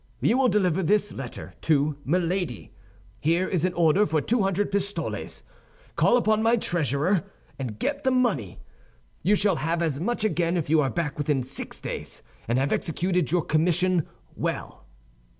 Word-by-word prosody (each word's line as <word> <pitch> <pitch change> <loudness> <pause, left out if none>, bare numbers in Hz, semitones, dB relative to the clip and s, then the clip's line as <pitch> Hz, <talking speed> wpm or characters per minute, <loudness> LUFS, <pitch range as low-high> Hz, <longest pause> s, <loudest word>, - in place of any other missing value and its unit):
You 245 - +2
will 265 - +4
deliver 190 -4 +2
this 205 +3 +2
letter 130 -3 -7
to 150 -1 +2
Milady. 175 - -1 0.5
Here 170 +5 +1
is 175 -4 -1
an 185 - 0
order 175 +5 +3
for 155 0 +1
two 235 +9 +1
hundred 195 +1 0
pistoles; 200 +1 -3 0.5
call 245 - +4
upon 220 -2 +2
my 230 +2 +3
treasurer 165 - +1 0.4
and 120 -6 -4
get - - -2
the 260 - +3
money. 230 - 0 0.6
You 200 +6 +3
shall 195 -4 +2
have 165 +2 0
as 150 -4 -1
much 230 +6 -1
again 175 -5 +1
if 155 -3 -2
you 160 -1 +5
are 135 - +1
back 150 -3 -3
within 145 -3 +1
six 130 +2 -5
days, - - -5 0.2
and 120 +2 +1
have 135 +2 +1
executed 180 - 0
your 175 -2 +2
commission 175 +2 +2 0.3
well." - - -4
175 Hz, 165 wpm, -26 LUFS, 150-200 Hz, 0.6 s, you